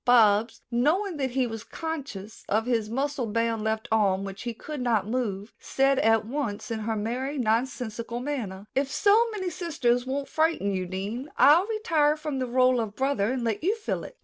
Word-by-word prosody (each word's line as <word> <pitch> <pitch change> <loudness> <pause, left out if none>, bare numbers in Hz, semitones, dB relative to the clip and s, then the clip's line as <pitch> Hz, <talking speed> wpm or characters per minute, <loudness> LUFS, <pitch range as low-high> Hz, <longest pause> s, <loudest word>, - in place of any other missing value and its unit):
Bobs, 225 -2 +4
knowing 320 +10 +1
that 265 -2 -1
he 255 +1 +1
was 225 -2 -5
conscious 280 - -6
of 220 +2 +1
his 230 -4 0
muscle 270 +1 -1
bound 230 0 0
left 220 +1 -1
arm, 195 -3 +2
which 195 0 -7
he 240 -1 -3
could 295 +4 -6
not 225 -5 +1
move, 215 -3 -3
said 270 0 +2
at 225 -1 +3
once 235 -4 -3
in 225 - -2
her 220 +1 -2
merry, 250 +7 -2
nonsensical 235 0 -1
manner: 230 -8 -4
"If 275 +1 0
so 430 - +4
many 380 -5 -3
sisters 265 -8 0
won't 275 +1 -2
frighten 315 -10 +1
you, 185 -1 -2
Dean, 205 +9 -4
I'll 330 +7 +6
retire 325 -10 +2
from 300 -3 -3
the 255 - -1
role 255 0 +3
of 215 -2 -5
brother 260 -5 +1
and 260 -2 -2
let 225 +3 -1
you 400 +6 +2
fill 450 - -3
it." - - -11
245 Hz, 190 wpm, -27 LUFS, 220-290 Hz, -, I'll